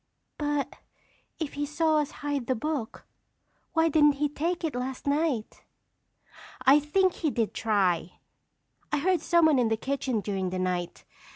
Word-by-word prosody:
"But 290 -1 -1 0.6
if 315 -4 -4
he 290 - -3
saw 310 +2 +1
us 295 -1 -1 0.2
hide 285 -4 -2
the 260 - +1
book, 280 -2 -4 0.7
why 325 0 +3
didn't 295 -2 +5
he 290 +1 -1
take 340 +5 -2
it 320 - -1
last 250 +1 -4
night?" 285 -6 -1 1.0
"I 275 +3 +7
think 370 +5 +2
he 315 - -1
did 230 -5 -1
try. 185 -6 +1 0.8
I - - +2
heard 360 +4 +1
someone 315 -5 +4
in 235 -2 +2
the 225 - +1
kitchen 265 -2 -1
during 195 -2 -2
the 185 - -4
night. 180 -1 -3
285 Hz, 155 wpm, -27 LUFS, 225-310 Hz, 1.0 s, I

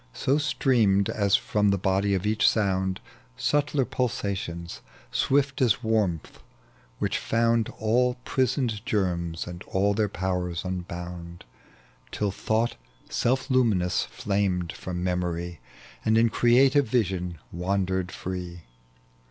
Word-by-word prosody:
So 140 +3 +1
streamed 120 -10 +2
as 100 -1 +3
ftom 105 -1 +1
the 100 - +2
body 95 +1 +1
of 95 +1 -2
each 110 +1 +4
sound 95 -3 0 0.4
Subtler 145 - +1
pulsations, 100 -9 -3 0.3
swift 135 -1 +1
as 120 -1 +3
warmth, 105 -8 0 0.6
which - - -1
found 115 0 +1
All 125 +3 +2
prisoned 125 -5 0
germs 90 -8 -1
and 90 0 -8
all 100 +2 +1
their 105 0 +1
powers 90 -2 -2
unbound, 90 -1 -6 0.7
TUl 105 -1 -1
thought 110 - -1 0.3
self 130 +3 0
luminous 105 -9 +2
flamed 90 +5 -1
from 90 -1 -5
memory, 85 -2 -2 0.4
And 110 0 +3
in 115 +1 +5
creative 130 +4 +4
vision 95 -7 -1
wandered 95 +1 -1
free. 90 -2 -6
100 Hz, 115 wpm, -26 LUFS, 90-115 Hz, 0.7 s, in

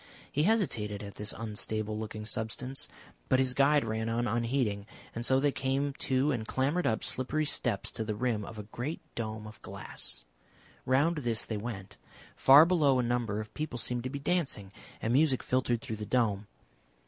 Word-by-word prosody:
He 145 - +1
hesitated 110 - 0
at 100 -1 -7
this 105 0 -1
unstable 110 -1 -3
looking 110 0 -5
substance, 115 +5 -1 0.4
but 130 - +5
his 130 -1 +2
guide 140 0 +4
ran 110 0 -1
on 120 +1 0
unheeding, 115 -3 0 0.3
and 115 - -4
so 130 +2 +4
they 145 +1 +3
came 135 +1 0
to 135 +3 +2
and 115 -5 -2
clambered 140 +5 +1
up 110 - 0
slippery 150 +4 0
steps - - 0
to - - -3
the 105 -1 -2
rim 115 -2 0
of 110 +2 -8
a 105 - -5
great 120 +9 -5
dome 110 -1 -4
of 110 0 -11
glass. - - -4 0.6
Round 145 +6 +3
this 120 -6 0
they 110 - -3
went. 100 -3 -6 0.4
Far 140 +4 +8
below 155 -7 +4
a 125 - +2
number 120 -3 0
of 110 0 -7
people 150 -5 -3
seemed 120 0 -2
to 130 - -2
be 140 - -4
dancing, 140 - -1 0.3
and 115 - +1
music 140 -1 +3
filtered 120 -2 +1
through 110 - -4
the 105 - -5
dome.... 105 -5 +1
120 Hz, 185 wpm, -31 LUFS, 110-135 Hz, 0.6 s, Far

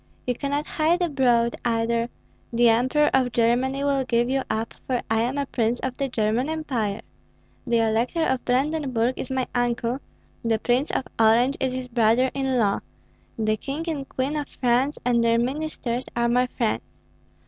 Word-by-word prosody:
You 250 - +1
cannot 285 +3 -2
hide 325 +3 +1
abroad, 245 -7 +2
either: 230 0 0 0.4
the 235 0 +4
Emperor 260 +6 +3
of 255 -2 +2
Germany 245 +4 +1
will 280 -1 +1
give 240 0 +1
you 270 0 +1
up, 220 +1 -2
for 250 -2 0
I 225 0 +3
am 250 +4 -1
a 280 - 0
prince 235 -2 0
of 260 -1 -3
the 275 -1 -1
German 230 +4 0
Empire; 250 -10 -2 0.7
the 235 -1 +3
Elector 230 +9 +1
of 260 -4 0
Brandenburg 260 -2 +1
is - - -5
my 260 -1 0
uncle; 245 +1 0 0.4
the 230 -1 +2
Prince 245 +6 +1
of 260 - -1
Orange 235 +5 +4
is 260 -1 0
his 255 0 -4
brother 240 +2 +3
in 265 -2 0
law; 205 -4 +2 0.6
the 215 -1 +1
King 285 +8 -4
and 280 -4 -4
Queen 265 +3 -2
of 295 -1 -2
France 255 +4 +1
and 240 -1 +3
their 230 0 +3
ministers 255 -1 -2
are 235 0 +2
my 250 +1 +2
friends. 235 -3 -1
250 Hz, 170 wpm, -24 LUFS, 235-270 Hz, 0.7 s, the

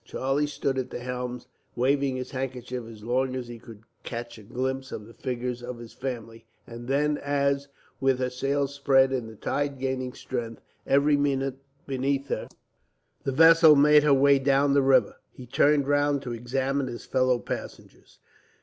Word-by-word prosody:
Charlie 135 +5 -1
stood 135 -2 -2
at 130 -1 -4
the - - -6
stern, 125 0 -4 0.3
waving 135 +1 +1
his 130 0 -5
handkerchief 125 -2 -5
as 110 -2 -12
long 130 +3 0
as 125 -2 -4
he 120 -1 -9
could 110 -2 -13 0.2
catch 120 -1 -6
a - - -12
glimpse 130 +5 -4
of 105 - -6
the 115 - -14
figures 125 -1 -4
of 120 0 -6
his 115 -1 -11
family; 115 -3 -6 0.2
and 120 +1 -9
then 145 +2 +1
as, 140 0 0 0.3
with 135 -1 +2
her 125 0 -2
sails 140 +2 -1
spread 135 -2 +3
and 125 -4 -2
the 110 - -12
tide 140 +5 -2
gaining 130 -1 -3
strength 115 -4 -5 0.3
every 145 +2 +4
minute 135 -2 -1 0.3
beneath 135 +1 -1
her, - - -3 0.8
the 135 - 0
vessel 160 +2 +7
made 150 +1 +6
her 150 0 +3
way 140 0 +5
down 140 +1 +3
the 140 - +4
river, 135 0 +3 0.2
he 125 - -11
turned 140 +3 +2
round 145 -1 +2
to 125 -3 -4
examine 130 +3 -1
his 120 -1 -7
fellow 130 -1 +2
passengers. - - -8
130 Hz, 175 wpm, -26 LUFS, 125-140 Hz, 0.8 s, vessel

